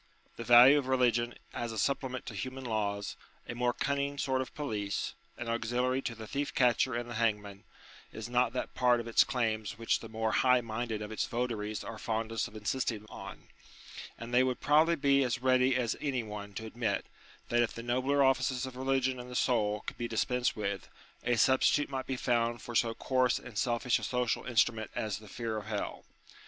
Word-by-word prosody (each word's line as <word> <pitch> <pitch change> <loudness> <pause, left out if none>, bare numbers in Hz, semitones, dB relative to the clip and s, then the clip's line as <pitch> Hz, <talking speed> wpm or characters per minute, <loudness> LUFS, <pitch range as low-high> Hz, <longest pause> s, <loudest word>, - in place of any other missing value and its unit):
The 115 - -6
value 120 +5 +8
of 135 - -5
religion 120 -2 +2 0.2
as 120 -1 -3
a 110 - -6
supplement 130 +2 -1
to - - -6
human 130 0 -5
laws, 105 -3 -2 0.3
a - - -4
more 120 +1 +1
cunning 140 +2 -1
sort 130 -1 0
of 130 - -7
police, 105 -9 -2 0.2
an 120 - -5
auxiliary 120 +3 0
to 120 - -4
the 110 0 -8
thief 140 +6 -3
catcher 125 0 +3
and 120 0 -3
the 120 - -6
hangman, 105 -3 -1 0.5
is 110 0 -6
not 125 -1 +2
that 130 - -3
part 125 -1 +3
of 115 - -5
its 115 - +5
claims 110 -5 -2
which 115 0 +1
the 115 - -9
more 110 0 -1
highminded 120 -3 +1
of 105 - -7
its 110 - -1
votaries 115 -3 -2
are 115 - -7
fondest 115 0 -2
of - - -15
insisting 110 0 -2
on: - - -10 0.7
and 115 +1 -8
they 125 - +6
would 130 -1 0
probably 155 +4 +4
be 140 -2 +3
as 125 -1 -2
ready 130 0 +4
as 120 -3 0
any 130 -5 -1
one 105 -1 -7
to 110 - -5
admit, 115 +1 -2 0.4
that 120 0 +3
if 120 - +1
the 115 - -7
nobler 130 +4 +2
offices 130 -1 +2
of 130 -1 -8
religion 130 0 0
in 125 0 -8
the 125 - -7
soul 105 -5 +1
could - - -7
be 120 - -1
dispensed 125 +2 0
with, 100 -3 -3 0.3
a 120 - +2
substitute 130 +4 +3
might 130 -1 -3
be 135 - -1
found 120 -1 +1
for 120 - -8
so 115 0 +2
coarse 130 -1 +2
and 120 -3 -10
selfish 120 +2 +1
a - - -10
social 125 -2 -1
instrument 115 -2 +2
as 110 -1 -2
the 110 - -14
fear 115 -1 -3
of 105 -1 -6
hell. 105 -2 -4
120 Hz, 200 wpm, -31 LUFS, 110-130 Hz, 0.7 s, value